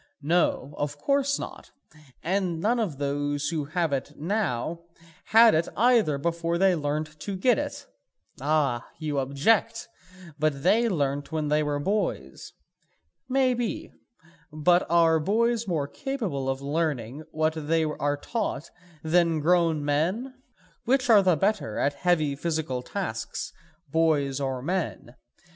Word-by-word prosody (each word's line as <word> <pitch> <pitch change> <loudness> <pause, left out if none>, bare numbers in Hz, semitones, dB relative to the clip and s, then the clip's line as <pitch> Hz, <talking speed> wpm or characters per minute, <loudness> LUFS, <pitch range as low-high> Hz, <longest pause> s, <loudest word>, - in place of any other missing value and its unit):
No, 150 -3 +1
of 145 0 -2
course 280 - +1
not, - - -8 0.5
and 180 -1 -1
none 230 +7 +1
of 185 -11 -2
those 145 +1 -1
who 160 -3 -2
have 160 0 -1
it 135 +2 -3
now 165 - -2 0.5
had 225 +1 +7
it 160 +2 +1
either 230 - +4
before 170 +3 -1
they 190 +1 +4
learnt 155 0 -3
to 190 +5 -4
get 230 +5 +3
it. - - -5 0.6
Ah, 140 -4 0
you 150 -3 -2
object, 140 +11 +1 0.5
but 145 -2 0
they 230 +6 +4
learnt 145 -5 -1
when 155 -2 -1
they 150 +1 +3
were 145 -1 -1
boys. 170 - -2 0.8
Maybe; 255 -3 0 0.6
but 175 +4 +2
are 165 -1 +4
boys 230 +6 +1
more 155 -6 -1
capable 200 - -3
of 135 +1 -3
learning 145 -4 -2
what 155 0 0
they 165 0 +2
are 145 -2 -1
taught 185 - -3 0.3
then 165 0 +2
grown 165 -2 +2
men? 180 - 0 0.5
Which 255 0 +2
are 210 -2 +8
the 185 -3 +3
better 195 - 0
at 140 - +1
heavy 155 -2 +1
physical 155 -4 -2
tasks, 115 - -5 0.4
boys 150 -4 +1
or 130 -2 -3
men? 170 -7 -3
160 Hz, 135 wpm, -26 LUFS, 145-195 Hz, 0.8 s, are